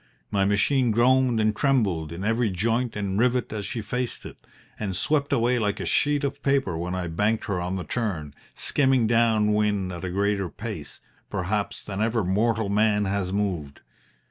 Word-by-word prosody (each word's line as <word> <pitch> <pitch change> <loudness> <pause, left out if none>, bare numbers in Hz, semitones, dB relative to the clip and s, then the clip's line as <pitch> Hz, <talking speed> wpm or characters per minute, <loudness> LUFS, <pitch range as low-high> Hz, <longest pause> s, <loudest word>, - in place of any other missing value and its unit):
My 100 -2 +2
machine 120 +6 +2
groaned 125 +1 +3
and 110 0 +2
trembled 100 - +1
in 85 +3 -6
every 115 +2 +1
joint 115 +6 0
and 100 -1 -2
rivet 125 -1 +1
as 105 -2 -4
she 120 -6 -4
faced 125 +3 -3
it, - - -12 0.3
and 100 -3 -2
swept 140 - 0
away 120 +1 +2
like 105 -2 -1
a - - -3
sheet 145 0 +2
of 140 0 -3
paper 135 -11 +1
when 90 +2 -3
I 90 -1 -2
banked 105 +7 0
her 95 -4 -2
on 90 +2 -2
the 95 - -3
turn, 85 - -3 0.2
skimming 130 -4 +2
down 110 -2 +3
wind 105 -3 +1
at 85 - -7
a 95 - -2
greater 100 0 0
pace, - - -7 0.3
perhaps, 100 +1 -2
than 100 0 -4
ever 115 0 +1
mortal 110 +4 +1
man 105 0 +2
has 95 -1 -1
moved. 90 -8 -2
105 Hz, 180 wpm, -25 LUFS, 95-120 Hz, 0.3 s, groaned